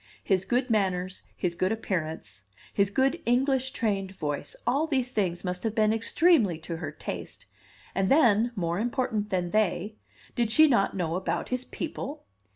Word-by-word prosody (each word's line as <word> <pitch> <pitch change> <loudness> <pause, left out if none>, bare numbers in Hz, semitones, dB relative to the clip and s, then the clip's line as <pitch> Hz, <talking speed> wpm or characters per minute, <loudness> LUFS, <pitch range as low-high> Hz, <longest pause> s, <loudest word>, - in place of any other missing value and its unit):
His 190 -1 +1
good 250 0 0
manners, 185 -3 0 0.2
his 175 -2 -1
good 185 +3 0
appearance, 160 - -3 0.3
his 200 -1 +2
good 270 - +1
English 265 +2 +2
trained 200 -6 -1
voice, 145 -4 -4
all 280 +6 +2
these 260 -5 0
things 180 -6 -1
must 180 -1 -3
have 225 -1 -1
been 215 -1 +3
extremely 225 - +3
to 165 +1 -6
her 155 -3 -5
taste; 155 - -6 0.5
and 195 0 +1
then 240 -5 +4
more 170 -2 -1
important 230 -3 -1
than 180 -2 -1
they 210 0 0 0.4
did 235 -2 0
she 310 +8 +6
not 200 -8 +2
know 165 -3 -1
about 185 - -2
his 255 0 -2
people? 300 -2 -5
210 Hz, 160 wpm, -28 LUFS, 180-250 Hz, 0.5 s, she